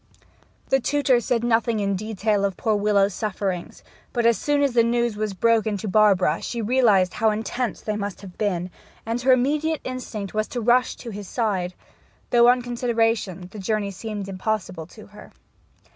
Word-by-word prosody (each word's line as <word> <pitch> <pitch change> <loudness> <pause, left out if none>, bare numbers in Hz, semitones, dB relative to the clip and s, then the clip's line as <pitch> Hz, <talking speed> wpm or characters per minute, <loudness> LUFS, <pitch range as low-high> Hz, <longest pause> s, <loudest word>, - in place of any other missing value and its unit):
The 270 - +4
tutor 270 -2 +2
said 235 0 -1
nothing 230 -1 +1
in 200 -1 0
detail 210 0 -1
of 195 -2 -1
poor 220 -1 +1
Willowes's 205 -1 +2
sufferings, 190 -3 -4 0.3
but 235 -2 0
as 235 0 +5
soon 290 +3 +1
as 275 -3 +1
the 235 - +5
news 235 -1 +1
was 210 -1 -3
broken 220 0 +2
to 205 - -5
Barbara 195 -5 +3
she 235 - -4
realized 215 -6 +3
how 225 - +2
intense 225 +3 -3
they 215 - -3
must 205 -2 -4
have 190 -3 -11
been, 185 -4 -2 0.3
and 230 +2 -2
her 260 +1 +4
immediate 295 +5 +1
instinct 230 -6 -5
was 215 0 0
to 245 - -4
rush 245 +2 +3
to 235 - -8
his 205 -1 -7
side, 190 -6 -1 0.6
though, 240 -1 +6
on 245 0 +4
consideration, 225 -6 -1
the 215 - -9
journey 205 0 -1
seemed 205 0 -6
impossible 185 -4 -3
to 215 +3 -14
her. 210 - -14
215 Hz, 175 wpm, -23 LUFS, 200-240 Hz, 0.6 s, though